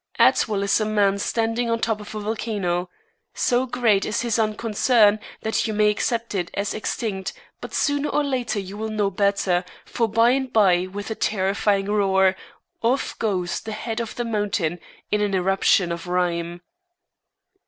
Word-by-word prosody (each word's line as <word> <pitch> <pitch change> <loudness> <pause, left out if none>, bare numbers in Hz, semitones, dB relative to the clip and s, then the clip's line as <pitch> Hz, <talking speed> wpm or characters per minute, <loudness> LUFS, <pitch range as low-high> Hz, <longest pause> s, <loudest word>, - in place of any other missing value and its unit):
Atwill 205 -2 +3
is 200 +2 +2
a - - +1
man 205 -2 +2
standing 230 +2 0
on 230 - +1
top 220 -2 -1
of 210 - -9
a - - -3
volcano. 205 -5 -2 0.5
So 250 +1 +1
great 230 -5 +2
is 215 - -1
his 235 -1 0
unconcern 215 0 +3 0.2
that 220 +1 0
you 215 - -3
may 210 0 +4
accept 230 +2 -2
it 180 -3 -2
as 200 +1 -1
extinct, 210 -3 -3 0.3
but - - -7
sooner 285 0 +1
or 295 - +1
later 255 -6 -1
you 195 +1 -7
will 220 0 -3
know 210 -2 0
better, 195 -2 +1 0.2
for 230 - 0
by 230 +2 +4
and 265 -1 -1
by, 185 -4 +4
with 205 +3 -6
a - - +1
terrifying 200 -1 0
roar, 190 -2 +3 0.5
off 245 +4 0
goes 185 -5 -1
the 220 - -6
head 225 +1 -4
of 230 -2 -4
the 240 - -2
mountain 205 -6 -1 0.3
in 210 - +2
an 205 -2 0
eruption 190 -1 +2
of 170 +1 -5
rhyme. 175 -1 -1
210 Hz, 170 wpm, -23 LUFS, 195-225 Hz, 0.5 s, may